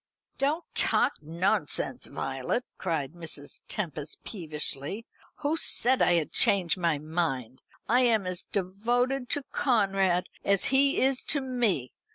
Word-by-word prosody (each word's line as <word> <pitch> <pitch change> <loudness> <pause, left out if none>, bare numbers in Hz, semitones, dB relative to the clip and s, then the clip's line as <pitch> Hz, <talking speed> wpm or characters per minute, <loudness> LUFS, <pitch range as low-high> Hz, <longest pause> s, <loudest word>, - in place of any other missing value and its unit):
"Don't 300 +5 +1
talk - - +2
nonsense, 170 +5 0
Violet," 250 - -2
cried 160 -5 -2
Mrs. 160 -4 -8
Tempest 155 -6 -5
peevishly. 155 +1 -4 0.4
"Who 300 +1 +1
said 260 -4 +2
I - - +5
had 165 -3 +1
changed 185 -4 +4
my 170 -4 +1
mind? 145 -6 -3 0.3
I 245 +4 +4
am 230 -6 +3
as 185 -1 -3
devoted 240 +7 0
to 290 - 0
Conrad 195 -8 +2 0.2
as 200 -1 +2
he 275 +1 +4
is 265 0 +2
to 295 - +2
me. 240 - -1
195 Hz, 130 wpm, -28 LUFS, 165-250 Hz, 0.4 s, I